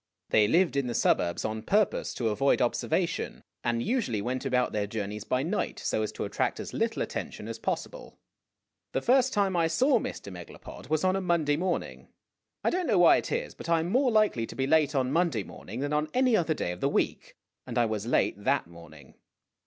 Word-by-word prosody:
They 105 -1 +5
lived 170 - +3
in 140 -2 0
the 120 - -3
suburbs 85 0 +1
on 110 0 -3
purpose 205 - +1
to 115 -3 0
avoid 135 +6 +2
observation, 120 -2 -1 0.2
and 120 -1 0
usually 225 - 0
went 125 +6 -3
about 125 -1 +1
their 105 -1 -1
journeys 105 -1 -4
by 130 +1 0
night 185 +7 -2
so - - -1
as 110 - -2
to - - -4
attract - - -1
as - - -6
little 225 0 0
attention - - -6
as - - -6
possible. - - -4 0.8
The - - 0
first 260 +1 +4
time 200 -4 +1
I 165 -1 +3
saw 250 - +3
Mr. 100 - -6
Megalopod 90 +7 -11
was 155 +1 +1
on 185 0 +3
a 195 - -1
Monday 170 -5 +1
morning. 180 +3 -3 0.6
I - - +2
don't 360 -1 -1
know 215 - +3
why 175 -1 +7
it - - -4
is, - - -2
but - - -9
I 165 -1 +4
am 170 +3 -3
more 255 +3 +3
likely 215 - +2
to - - -9
be 135 - 0
late 150 0 +3
on 130 -1 +1
Monday 160 - +1
morning 110 +7 -8
than 145 +1 -2
on 150 +1 0
any 255 -2 +4
other 165 -5 +1
day 90 - -2
of 90 - -8
the - - +2
week, - - -1 0.3
and - - -4
I 120 - +4
was 110 -1 -3
late 105 -4 +1
that - - +2
morning. 80 -5 -14
145 Hz, 215 wpm, -28 LUFS, -, 0.8 s, why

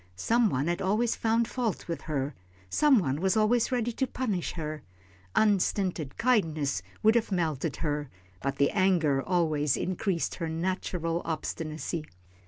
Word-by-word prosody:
Some 230 - +2
one 130 -2 0
had 175 +1 -1
always 215 +5 +1
found 225 +1 +1
fault 235 -5 -2
with 170 - -3
her, 140 -1 -1 0.4
some 295 -4 +5
one 145 -6 0
was 190 +3 +2
always 225 +3 +3
ready 240 -2 0
to 265 +3 -1
punish 215 -9 -2
her. 155 -2 -4 0.5
Unstinted 190 -7 +1
kindness 160 - +1 0.2
would 220 +1 +6
have 230 -3 +1
melted 160 -5 -1
her, 150 -3 -2 0.3
but 140 0 -2
anger 175 -8 +3
always 155 -5 +1
increased 185 -1 -1
her 165 - -1
natural 170 0 -2
obstinacy. 160 0 -3
175 Hz, 140 wpm, -29 LUFS, 155-220 Hz, 0.5 s, would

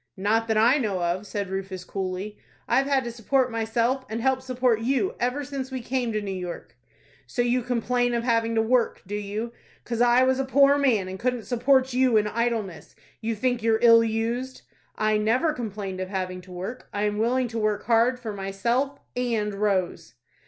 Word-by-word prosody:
"Not 220 +4 +1
that 220 -1 +1
I 240 +7 +5
know 200 -7 -1
of," 180 +4 -1
said 200 -2 -4
Rufus, 190 -1 -4
coolly. 190 +2 -5 0.3
"I've 265 +3 +2
had 275 -2 +2
to 235 - -4
support 250 +2 0
myself, 230 +3 0
and 220 +1 -3
help 260 +2 +1
support 250 -3 +1
you, 275 - 0
ever 255 +4 -1
since 265 -1 -5
we 260 -1 -4
came 245 0 -2
to 215 -1 -1
New 200 - -4
York." 175 -9 -7 0.5
"So 240 - 0
you 245 +1 +1
complain 245 0 0
of 235 - -1
having 230 -1 +1
to 225 - +3
work, 240 +1 +1
do 200 - -8
you? 210 +3 -3 0.3
'Cause 235 -1 -2
I 245 +1 +5
was 260 0 +2
a - - +2
poor 275 +1 +5
man, 230 -9 +2
and 190 0 -7
couldn't 250 -1 -1
support 260 +1 +2
you 255 -2 +3
in 210 - +3
idleness, 220 -5 -2 0.3
you 225 0 -2
think 245 +2 0
you're 225 0 +3
ill 230 -1 +8
used." 230 +4 -2 0.3
"I 215 0 +1
never 250 +9 +2
complained 205 -7 -5
of 185 0 -4
having 185 -2 -3
to 180 0 -15
work. 185 +8 -7
I 205 - -2
am 210 0 0
willing 250 +3 +1
to 230 0 -4
work 210 -1 0
hard 235 +2 +3
for 225 -4 -5
myself—and 230 +2 -2
Rose." 190 - -1
230 Hz, 195 wpm, -25 LUFS, 205-250 Hz, 0.5 s, ill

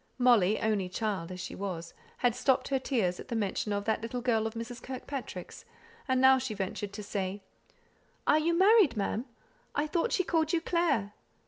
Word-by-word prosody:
Molly 225 -5 +4
only 205 -4 0
child 185 -3 -2
as 180 - -7
she - - -6
was 180 -4 -5 0.2
had 245 -2 +2
stopped 255 +1 +1
her 270 -1 +1
tears 215 -10 0
at - - -9
the 235 - -3
mention 210 -1 -1
of 205 0 -1
that 220 0 0
little 230 +2 -3
girl 225 -3 +1
of 220 - -7
Mrs. 230 +1 -6
Kirkpatrick's, 265 0 -7 0.4
and 260 -1 +2
now 265 0 +6
she 250 -4 -4
ventured 200 +1 -4
to 210 - -6
say, 200 -1 -3 0.8
"Are 305 - +5
you 335 +2 +1
married, 385 - +5
ma'am; 215 +4 -1 0.5
I 295 - +1
thought 335 +8 0
she 370 - +2
called 320 -2 +1
you 335 - +2
Clare?" 295 - +1
230 Hz, 190 wpm, -30 LUFS, 205-270 Hz, 0.8 s, now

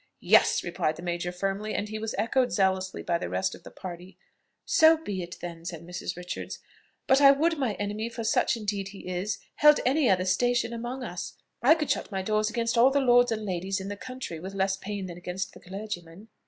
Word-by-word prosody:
"Yes," - - +5
replied 155 - -1
the 170 - -10
major 175 0 -2
firmly; 195 +4 -2
and 205 - -1
he 215 0 -4
was 220 0 -3
echoed 245 +4 +1
zealously 190 -1 0
by 170 -1 0
the - - -4
rest 190 0 -1
of - - -11
the - - -11
party. 180 0 -9 0.5
"So 320 0 +6
be 205 -12 -4
it 175 0 -7
then," 170 -1 -7
said 170 -1 -6
Mrs. 175 0 -5
Richards. 180 0 -6 0.5
"But 265 +2 +4
I 275 - +9
would 315 +3 +3
my 250 -6 0
enemy, 210 +2 -3
for 230 0 -6
such 225 +1 +2
indeed 205 -3 -3
he 195 -2 -10
is, 185 +2 -2 0.2
held 300 0 +7
any 275 0 +3
other 185 -1 +3
station 240 +5 +1
among 240 +3 -5
us. 175 -5 -6 0.3
I 280 +7 +6
could 305 -3 -1
shut - - -2
my 190 -1 -2
doors 215 +1 +1
against 230 0 0
all 250 +3 +7
the 280 +1 +2
lords 245 -2 +5
and 215 -1 -2
ladies 190 +1 -2
in 190 +1 -6
the 205 - -4
country 255 -7 -7
with 190 +4 -7
less 190 0 +1
pain 200 0 -5
than 175 -1 -8
against 180 +2 -4
the - - -13
clergyman." 190 0 -7
205 Hz, 220 wpm, -27 LUFS, 180-240 Hz, 0.5 s, I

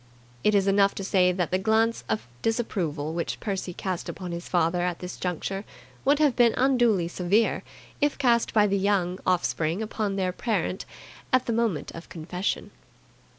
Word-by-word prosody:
It 210 - +4
is 195 -1 +4
enough 195 0 +4
to 195 - -4
say 185 -1 +3
that 180 -2 -1
the 185 - +2
glance 220 - +2
of 110 +1 -1 0.2
disapproval 170 -10 -1
which 170 0 -3
Percy 195 -3 -3
cast 185 0 -4
upon 180 -2 -6
his 170 0 -6
father 175 0 +2
at 175 -1 -1
this 180 0 -7
juncture 185 +2 -3 0.4
would 285 +2 +4
have 295 -4 +3
been 235 -2 +4
unduly 240 -9 +3
severe 185 +6 +1 0.4
if 290 0 +2
cast 240 -4 +3
by 210 -2 +4
the 200 -1 +1
Young 190 -2 +1
offspring 170 -1 +1
upon 215 -2 -2
their 185 -2 0
parent 195 -3 -2 0.5
at 255 -1 +3
the 235 - -1
moment 220 -10 0
of 165 - -10
confession. 180 +3 -3
195 Hz, 170 wpm, -26 LUFS, 175-225 Hz, 0.5 s, It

